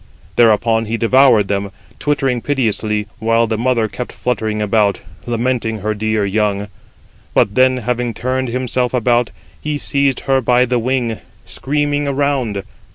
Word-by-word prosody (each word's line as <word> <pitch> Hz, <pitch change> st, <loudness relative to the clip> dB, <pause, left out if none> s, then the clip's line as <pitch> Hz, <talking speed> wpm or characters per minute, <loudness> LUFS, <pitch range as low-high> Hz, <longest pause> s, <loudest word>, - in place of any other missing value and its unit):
Thereupon 115 Hz, 0 st, +3 dB
he 115 Hz, +2 st, -2 dB
devoured 115 Hz, -3 st, +4 dB
them, 100 Hz, 0 st, -2 dB, 0.3 s
twittering 135 Hz, -4 st, 0 dB
piteously, 110 Hz, -6 st, -1 dB
while 115 Hz, +1 st, +2 dB
the 110 Hz, -1 st, -2 dB
mother 115 Hz, -1 st, +1 dB
kept 125 Hz, +4 st, -6 dB
fluttering 110 Hz, -3 st, -2 dB
about, 105 Hz, -1 st, +1 dB, 0.3 s
lamenting 115 Hz, -2 st, -1 dB
her 110 Hz, +2 st, -1 dB
dear 110 Hz, 0 st, 0 dB
young; 105 Hz, 0 st, -1 dB, 0.7 s
but 100 Hz, -, +3 dB
then, 130 Hz, +2 st, +4 dB
having 125 Hz, 0 st, -2 dB
turned 130 Hz, +3 st, -1 dB
himself 125 Hz, +1 st, -1 dB
about, 120 Hz, -1 st, +2 dB, 0.3 s
he 150 Hz, -1 st, -2 dB
seized 140 Hz, -2 st, 0 dB
her 135 Hz, -1 st, +1 dB
by 125 Hz, +1 st, +3 dB
the 125 Hz, 0 st, 0 dB
wing, 120 Hz, -2 st, -1 dB, 0.3 s
screaming 145 Hz, +1 st, -1 dB
around. 135 Hz, -7 st, -1 dB
120 Hz, 140 wpm, -17 LUFS, 110-130 Hz, 0.7 s, devoured